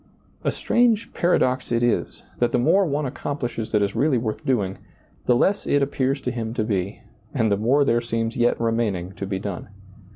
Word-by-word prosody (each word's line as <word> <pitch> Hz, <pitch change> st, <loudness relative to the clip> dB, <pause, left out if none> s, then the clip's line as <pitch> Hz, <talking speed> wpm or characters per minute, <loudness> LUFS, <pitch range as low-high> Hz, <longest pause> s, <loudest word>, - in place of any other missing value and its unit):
A -, -, +1 dB
strange 230 Hz, -2 st, +1 dB
paradox 130 Hz, -8 st, +1 dB
it 120 Hz, 0 st, +2 dB
is, 120 Hz, -, 0 dB, 0.2 s
that 120 Hz, -1 st, +2 dB
the -, -, +2 dB
more 175 Hz, +9 st, +3 dB
one 145 Hz, 0 st, -1 dB
ac 130 Hz, -, -4 dB
complishes 120 Hz, -5 st, -4 dB
that 105 Hz, -2 st, +3 dB
is 100 Hz, 0 st, -2 dB
really 140 Hz, -2 st, +2 dB
worth 115 Hz, +4 st, -3 dB
doing, 105 Hz, -9 st, 0 dB, 0.5 s
the 125 Hz, -, +5 dB
less 195 Hz, +11 st, +1 dB
it 145 Hz, -1 st, +3 dB
appears 135 Hz, 0 st, 0 dB
to 125 Hz, -, -2 dB
him 115 Hz, -1 st, -4 dB
to 110 Hz, -, 0 dB
be 100 Hz, -2 st, -2 dB, 0.3 s
and 110 Hz, -5 st, +2 dB
the -, -, +4 dB
more 130 Hz, +8 st, +3 dB
there 120 Hz, -2 st, +2 dB
seems 115 Hz, -1 st, -2 dB
yet 120 Hz, 0 st, +2 dB
remaining 115 Hz, -6 st, 0 dB
to 100 Hz, 0 st, -6 dB
be 95 Hz, -1 st, -2 dB
done. 100 Hz, -1 st, -5 dB
120 Hz, 200 wpm, -23 LUFS, 110-140 Hz, 0.5 s, the